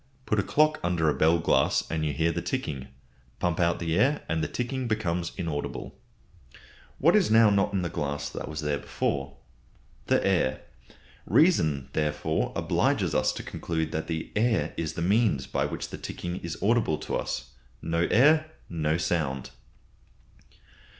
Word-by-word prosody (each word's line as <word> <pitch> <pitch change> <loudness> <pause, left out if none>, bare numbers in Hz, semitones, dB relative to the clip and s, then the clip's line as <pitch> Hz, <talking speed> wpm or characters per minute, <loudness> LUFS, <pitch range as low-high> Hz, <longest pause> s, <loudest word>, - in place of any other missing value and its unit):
Put 110 - +1
a - - +2
clock 155 +9 +2
under 85 -2 +2
a - - +2
bell 80 +2 +3
glass 80 - +2
and 80 -1 -1
you 75 - 0
hear 80 +3 +1
the 85 +1 -3
ticking. 75 - -3 0.5
Pump 90 -1 -1
out 85 -1 +2
the 80 -1 -1
air 140 +7 +2
and 80 0 -1
the - - 0
ticking 125 +1 -3
becomes 90 -6 -1
inaudible. 75 -4 -4 1.0
What 170 +7 +4
is 205 -4 +4
now 110 -1 +6
not 100 -1 +2
in 95 -2 -1
the - - 0
glass 75 -3 -3
that - - -6
was 80 0 -4
there 75 -1 -1
before? 70 0 -3 0.7
The - - +2
air. 65 - +1 0.7
Reason, 80 - +3
therefore, 75 -2 -1
obliges - - +1
us - - +2
to - - -6
conclude 80 -1 -3
that 80 +1 -3 0.3
air 110 -8 +1
is 80 -2 -3
the 85 - -3
means 100 - +1
whereby - - 0
the - - -6
ticking 90 +1 -5
is 85 -3 -5
audible 110 -7 +2
to - - -4
us. - - -3 0.3
No 85 +1 +1
air, 155 +6 +5 0.2
no 80 -1 0
sound. 75 -7 -1
85 Hz, 160 wpm, -27 LUFS, 80-110 Hz, 1.0 s, now